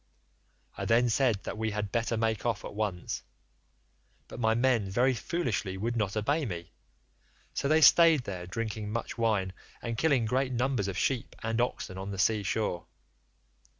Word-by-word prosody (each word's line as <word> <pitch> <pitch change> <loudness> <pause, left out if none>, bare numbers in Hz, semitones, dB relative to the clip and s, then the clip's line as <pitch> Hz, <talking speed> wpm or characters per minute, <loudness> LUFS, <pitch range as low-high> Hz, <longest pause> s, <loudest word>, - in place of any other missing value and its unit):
I - - -2
then 120 +2 +3
said 115 -4 +2
that - - -5
we 110 0 0
had 105 -1 -3
better 115 -1 0
make 110 -1 0
off 115 -5 -1
at - - -7
once, 100 -4 -3 1.1
but - - -9
my 110 -1 +2
men 120 -5 +2
very 125 +6 +3
foolishly 115 - -2
would 115 +5 -2
not 105 -2 -1
obey 145 +9 +1
me, 85 -8 -5 0.8
so 140 - -1
they 155 +2 +4
staid 160 -2 +7
there 90 -5 -6
drinking 110 +1 -4
much 115 +1 -4
wine 105 -5 +1 0.3
and 115 -1 -4
killing 140 -8 +3
great 130 +3 0
numbers 125 -4 0
of 95 -2 -3
sheep 125 +4 -1
and 115 +1 0
oxen 95 -6 -3
on 95 +1 -5
the 100 - -5
sea 105 +2 +2
shore. 100 -3 -2
110 Hz, 170 wpm, -29 LUFS, 100-125 Hz, 1.1 s, staid